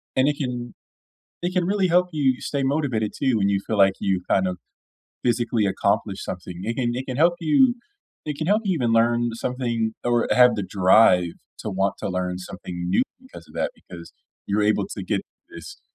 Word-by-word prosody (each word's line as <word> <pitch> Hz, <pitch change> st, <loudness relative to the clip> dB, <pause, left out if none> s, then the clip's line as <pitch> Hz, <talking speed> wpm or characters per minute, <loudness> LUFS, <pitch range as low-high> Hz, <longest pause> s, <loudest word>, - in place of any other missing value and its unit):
And 130 Hz, +1 st, +3 dB
it 145 Hz, 0 st, 0 dB
can 125 Hz, -3 st, -4 dB, 0.7 s
it 175 Hz, +1 st, -1 dB
can 180 Hz, -1 st, +1 dB
really 195 Hz, -1 st, +1 dB
help 180 Hz, +1 st, +3 dB
you 135 Hz, -4 st, +1 dB
stay 140 Hz, -2 st, -2 dB
motivated, 135 Hz, -7 st, 0 dB
too, 130 Hz, -4 st, +1 dB
when 100 Hz, -1 st, +2 dB
you 100 Hz, -1 st, +1 dB
feel 110 Hz, -, -1 dB
like 95 Hz, -1 st, +5 dB
you 95 Hz, -2 st, 0 dB
kind 95 Hz, -1 st, +2 dB
of 90 Hz, -1 st, -3 dB, 0.7 s
physically 120 Hz, -2 st, +1 dB
accomplished 100 Hz, 0 st, -1 dB
something. 90 Hz, -1 st, -7 dB
It 115 Hz, -, -2 dB
can 120 Hz, -2 st, 0 dB
it 130 Hz, +2 st, -4 dB
can 130 Hz, -, -4 dB
help 170 Hz, +4 st, +4 dB
you 240 Hz, -, +4 dB, 0.5 s
I 150 Hz, -, -1 dB
can 155 Hz, -, -3 dB
help 210 Hz, +3 st, +2 dB
you 190 Hz, -3 st, +1 dB
even 120 Hz, -6 st, 0 dB
learn 120 Hz, +1 st, +3 dB
something, 115 Hz, -2 st, -2 dB
or 120 Hz, -1 st, +1 dB
have 125 Hz, -1 st, +6 dB
the 105 Hz, -, -2 dB
drive 95 Hz, -2 st, +4 dB, 0.3 s
to 105 Hz, -, -4 dB
want 95 Hz, +1 st, 0 dB
to -, -, -4 dB
learn 90 Hz, -1 st, -2 dB
something 90 Hz, -1 st, -7 dB
new 95 Hz, -, +3 dB, 0.2 s
because 260 Hz, -, -14 dB
of -, -, -18 dB
that, -, -, -1 dB
because 85 Hz, -1 st, -12 dB, 0.3 s
you're 105 Hz, +1 st, +1 dB
able 105 Hz, -, +2 dB
to -, -, -6 dB
get -, -, -1 dB, 0.3 s
this 405 Hz, -, -11 dB
120 Hz, 200 wpm, -23 LUFS, 100-140 Hz, 0.7 s, have